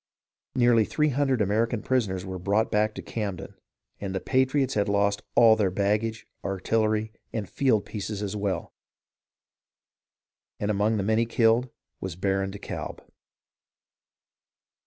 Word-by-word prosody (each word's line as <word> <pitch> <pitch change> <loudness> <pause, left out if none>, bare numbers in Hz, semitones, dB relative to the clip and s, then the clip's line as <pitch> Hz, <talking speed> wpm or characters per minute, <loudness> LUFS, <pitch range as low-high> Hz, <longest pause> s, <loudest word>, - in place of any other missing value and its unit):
Nearly 120 -2 +5
three 150 +7 +1
hundred 135 -3 +1
American 110 +3 0
prisoners 100 -8 0
were 95 -1 -5
brought 100 +5 +1
back 105 +1 +1
to - - -6
Camden, 100 -5 -4 0.5
and 95 -1 -4
the - - 0
patriots 130 +2 +1
had 100 -1 +1
lost 100 0 +2
all 115 -2 +7
their 105 -3 +1
bag 100 +3 +1
gage, 115 -1 -5 0.2
artillery, 110 +2 0 0.2
and 105 -4 -3
field 120 -4 +1
pieces 105 -1 -4
as 100 0 -3
well; 100 -4 -2 1.9
and 105 +1 0
among 105 +2 +1
the 100 - 0
many 110 +3 +2
killed 115 +2 +3 0.3
was 95 -3 -5
Baron 95 +1 0
de 100 - -7
Kalb. - - -6
105 Hz, 135 wpm, -26 LUFS, 100-115 Hz, 1.9 s, all